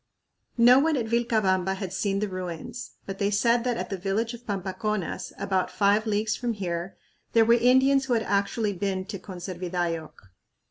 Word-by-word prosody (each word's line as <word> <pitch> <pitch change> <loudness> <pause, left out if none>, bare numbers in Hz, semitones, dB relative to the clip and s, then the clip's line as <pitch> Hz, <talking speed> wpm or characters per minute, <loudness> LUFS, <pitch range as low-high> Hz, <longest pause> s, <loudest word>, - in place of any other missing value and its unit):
No 245 +2 +7
one 310 +1 +2
at 235 - -1
Vilcabamba 215 -5 +1
had 190 -2 -5
seen 195 +1 0
the 210 - 0
ruins, 180 -4 -6
but 195 0 -6
they 200 - +2
said 230 +3 +2
that 245 -1 0
at - - -5
the 195 - -3
village 210 +5 -1
of 240 +1 -11
Pampaconas, 195 0 -3
"about 190 -1 0
five 205 +2 +2
leagues 215 +1 0
from 240 -1 -2
here," 180 -2 -4 0.4
there 225 -1 +5
were 235 - +5
Indians 260 +3 +4
who 255 - 0
had 225 -1 +1
actually 205 +1 0
been 190 0 -2
to 200 -1 -6
Conservidayoc. 175 -3 -4
205 Hz, 175 wpm, -26 LUFS, 185-235 Hz, 0.4 s, No